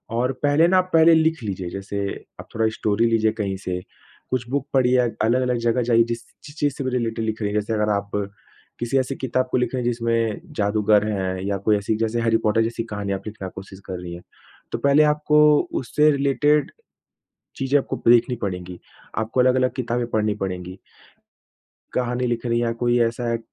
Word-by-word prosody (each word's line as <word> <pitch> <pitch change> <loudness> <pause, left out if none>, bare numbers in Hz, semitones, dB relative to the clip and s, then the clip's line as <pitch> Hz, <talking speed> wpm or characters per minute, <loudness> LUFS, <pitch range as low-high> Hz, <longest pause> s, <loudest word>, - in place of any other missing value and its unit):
और 125 +2 +1
पहले 145 +3 +4
ना, 185 +1 +4
पहले 165 -2 +5
लिख 160 -3 +2
लीजिए 95 -4 -4
जैसे 100 +2 -4 0.4
आप - - -10
थोड़ा 110 0 +2
स्टोरी 110 +2 +1
लीजिए 110 -1 +2
कहीं 100 -4 -3
से, 90 -1 -4 0.5
कुछ 125 -2 -2
बुक 140 +1 -2
पढ़िए, 130 -1 +4
अ 120 - +2 0.2
अलग-अलग 125 +1 +1
जगह 120 +2 +2
जाइए 115 -1 +4
जिस 115 0 -3 0.2
ची 145 - -11
चीज़ 145 -2 0
से 135 - -5
भी 130 - -1
रिलेटेड 115 -2 -1
लिख 110 0 -3
रही 105 -1 -1
हैं, 105 - +1
जैसे 105 +2 -3
अगर 105 -1 0
आप 100 -1 -1 0.7
किसी 120 +3 0
ऐसी 130 +1 0
किताब 130 0 -1
को - - +2
लिख 125 -1 -1
रही 125 -2 -1
हैं 120 - +1
जिसमें 115 -2 -1
जादूगर 105 0 +2
है 95 -2 -2
या 100 -1 0
कोई 105 -1 +4
ऐसी 105 +2 -1
जैसे 115 +1 -1
हैरी 115 -1 +3
पॉटर 110 +1 +3
जैसी 115 0 -3
कहानियाँ 100 -3 -4
आप - - -14
लिखना 105 -3 -6
कोशिश 95 0 -11
कर 90 -2 -5
रहीं 90 -1 -7
हैं। 85 - -9 0.5
तो - - -1
पहले 140 +2 +4
आपको 150 0 +3 0.4
उससे 150 +4 +3
रिलेटेड, 145 +1 +2 0.8
चीज़ें 135 +1 +1
आपको - - -4
देखनी 120 +2 +4
पड़ेंगी। 90 -3 -5 0.4
आपको 110 +3 -1
अलग-अलग 130 0 +2
किताबें 120 -1 -1
पढ़नी 105 -1 +1
पड़ेंगी। 90 -1 -5 1.2
कहानी 125 0 0
लिख 120 0 -2
रही 120 0 +1
हैं 120 - 0
या 115 - 0
कोई 120 0 +3
ऐसा 120 +1 0
है 115 0 0
115 Hz, 200 wpm, -22 LUFS, 105-130 Hz, 1.2 s, पहले